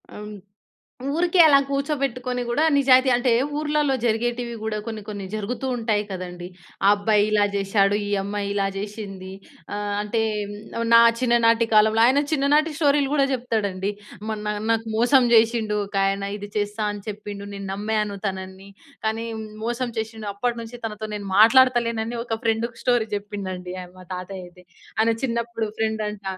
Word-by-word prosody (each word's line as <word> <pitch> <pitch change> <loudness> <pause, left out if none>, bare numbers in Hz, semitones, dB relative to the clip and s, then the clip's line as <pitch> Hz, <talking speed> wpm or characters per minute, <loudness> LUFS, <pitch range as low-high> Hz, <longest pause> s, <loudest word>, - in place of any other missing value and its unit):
ఆ! - - -13
హ్మ్. 210 0 -8 0.8
ఊరికే 350 +2 +1
అలా 285 -3 +7
కూర్చోబెట్టుకొని 275 -3 -2
గూడా 285 +6 +2
నిజాయితీ 260 -1 +5
అంటే 245 +1 +2 0.3
ఊర్లల్లో 300 -2 +1
జరిగేటివి 235 +1 -1
గూడా 220 -1 -2
కొన్ని, 220 -2 -5
కొన్ని 205 -2 -6
జరుగుతూ 215 +5 -3
ఉంటాయి 220 -3 0
కదండీ. 180 -1 -6 0.4
ఆ - - +7
అబ్బాయి 205 0 +2
ఇలా 210 -1 +3
జేషాడు, 200 0 +2
ఈ - - -4
అమ్మాయి 200 0 -3
ఇలా 200 -1 +1
జేషింది. 195 -2 -6 0.4
ఆహ్, 205 0 -2
అంటే 210 +2 -1 0.3
హ్మ్, - - -6 0.2
నువ్వు 230 0 -2
నా 230 - +9 0.2
చిన్ననాటి 230 -2 +3
కాలంలో. 215 +1 +5
ఆయన 270 +3 +4
చిన్ననాటి 300 +2 +3
స్టోరీలు 285 -3 +3
గూడా 280 -2 +4
జెప్తడండి. 210 -6 -1 0.4
"మొన్న 210 -1 -3 0.2
నాకు 225 0 -1
మోసం 250 +3 +5
జేషిండు 225 -2 +3
ఒకాయన. 195 0 0
ఇది 205 0 -8
చేస్తా 205 +1 -2
అని 205 -1 -8
చెప్పిండు, 205 -1 -6
నేను 200 0 -6
నమ్మాను 210 0 -2
తనని 190 0 -6 0.4
కానీ 225 +1 -1
హ్మ్, 220 0 -6 0.2
మోసం 240 +2 -1
చేషిండు. 220 -1 -5
అప్పటినుంచి 235 +2 -3
తనతో 215 -1 -4
నేను 205 -1 -5
మాట్లాడతలేనని" 235 -1 +4
ఒక 225 - -1
ఫ్రెండుకు 230 +1 -1
స్టోరీ 240 -3 +2
జెప్పిండండి 185 -3 -6
ఆహ్, 180 - -14
మా 185 - -12
తాతయ్యయితే. 180 -1 -8 0.3
ఆయన 225 +1 +4
చిన్నప్పుడు 235 -2 -2
ఫ్రెండంట. 215 -2 -2
220 Hz, 150 wpm, -23 LUFS, 205-240 Hz, 0.8 s, నా